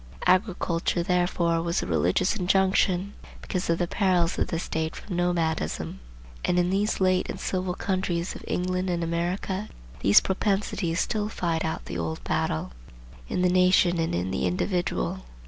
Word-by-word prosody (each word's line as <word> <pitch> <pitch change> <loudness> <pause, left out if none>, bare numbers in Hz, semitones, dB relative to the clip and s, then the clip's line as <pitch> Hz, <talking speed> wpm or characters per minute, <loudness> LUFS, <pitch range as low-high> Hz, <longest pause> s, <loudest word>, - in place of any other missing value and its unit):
Agriculture 180 -3 +1
therefore 175 -2 +1
was 170 - -1
a - - -3
religious 90 - +1
injunction, 190 0 +2 0.3
because 185 -2 -3
of 165 - +3
the 175 - +1
perils 180 -3 +1
of - - +1
the 165 - -2
state 160 -1 -3
from 190 - -6
nomadism. 165 - -1 0.4
And 180 - +1
in 180 0 +2
these 205 +3 +1
late 185 -1 +2
and - - -5
civil 185 -1 -2
countries 185 -3 -1
of - - -10
England 185 +1 -1
and 170 -1 0
America 180 +4 -2 0.3
these 100 - +7
propensities 195 -3 -1
still 210 -2 -1
fight 170 -6 -1
out 160 - -3
the 85 - -5
old 80 -1 -3
battle, 80 -6 -1 0.6
in 180 - 0
the 180 - +4
nation 180 -1 +4
and 165 - 0
in 90 +2 -1
the 95 - 0
individual. 175 - -1
180 Hz, 160 wpm, -26 LUFS, 165-185 Hz, 0.6 s, these